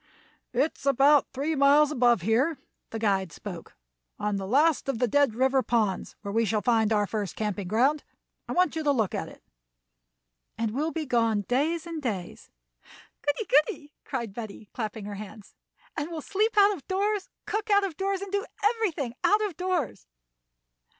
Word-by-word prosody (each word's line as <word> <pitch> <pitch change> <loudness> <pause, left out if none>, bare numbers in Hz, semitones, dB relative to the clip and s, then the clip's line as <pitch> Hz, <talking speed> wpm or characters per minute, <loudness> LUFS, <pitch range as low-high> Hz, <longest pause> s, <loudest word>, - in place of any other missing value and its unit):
"It 270 +6 0
is 280 - -7
about 275 +2 +5
three 285 +5 -1
miles 290 +1 +5
above 240 - +3
here," 255 - +2 0.3
the 225 - -5
guide 195 -5 0
spoke, 175 +1 -9 0.4
"on 210 -1 -1
the 195 -1 -4
last 285 +5 +3
of 270 - 0
the 245 +1 +1
Dead 275 -1 +2
River 265 +2 +3
Ponds, 215 -5 -1
where 200 - -4
we 225 +2 +2
shall 215 -1 0
find 225 -3 +2
our 210 -1 +3
first 205 -4 -4
camping 210 -3 -3
ground. 260 +9 +2 0.4
I - - -3
want 360 -3 +2
you 320 - -2
to 290 - +3
look 225 -8 0
at - - -3
it." - - -16 1.1
"And 225 -1 -1
we'll 300 +6 0
be 320 0 -3
gone 230 -5 +2
days 300 - 0
and 330 -2 -5
days." 200 -9 -5 0.7
"Goody! 290 +10 -1
goody!" 295 0 +1
called 235 -7 -4
Betty, 215 -2 -8
clapping 220 -2 -4
her 205 - -5
hands. 210 0 -10 0.4
"And 290 +3 -3
we'll 325 -2 -5
sleep 425 +7 0
out 405 0 +6
of 280 - -14
doors, 400 +1 -1 0.2
cook 430 +1 -3
out 405 -1 +5
of 375 -5 -3
doors, 390 +2 -1
and 395 - -8
do 400 0 0 0.2
everything 405 - 0
out 420 +1 +4
of 390 -6 -5
doors." 350 - -2
265 Hz, 180 wpm, -27 LUFS, 220-325 Hz, 1.1 s, out